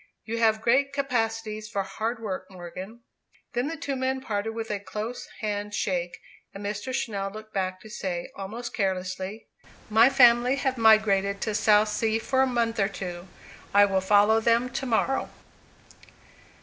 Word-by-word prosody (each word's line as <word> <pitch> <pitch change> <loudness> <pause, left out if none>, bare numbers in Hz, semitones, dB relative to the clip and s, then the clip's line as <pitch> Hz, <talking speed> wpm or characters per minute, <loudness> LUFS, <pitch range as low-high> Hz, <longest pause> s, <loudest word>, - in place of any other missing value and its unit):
You 230 +1 -3
have 220 -1 +3
great 275 +4 +3
capacities 225 -5 -2
for 200 -1 -1
hard 220 +5 -3
work, 185 -3 -4
Morgan." 185 +5 -9 0.5
Then 245 +3 0
the 325 +1 -4
two 285 -3 -3
men 260 0 -1
parted 225 -3 -3
with 225 -1 -4
a 205 - -1
close 215 +4 -6
hand 205 -1 -3
shake. 175 -4 -2 0.4
And 200 +1 -7
Mr. 210 +5 -3
Channell 200 -6 -2
looked 215 +1 -11
back 185 -1 -2
to - - -12
say, 175 -4 -4
almost 220 +5 -6
carelessly, 190 +1 -3 0.5
"My 225 +4 +7
family 245 -1 +5
have 270 -2 -1
migrated 200 -3 +4
to 215 - -1
Southsea 215 +1 +3
for 260 +3 +1
a 265 - +4
month 235 -3 0
or 195 0 +2
two. 180 -2 -6 0.5
I 205 0 +8
follow 205 +3 +4
them 235 +2 +2
to 270 - -3
morrow." 250 +3 +1
215 Hz, 155 wpm, -26 LUFS, 200-235 Hz, 0.5 s, I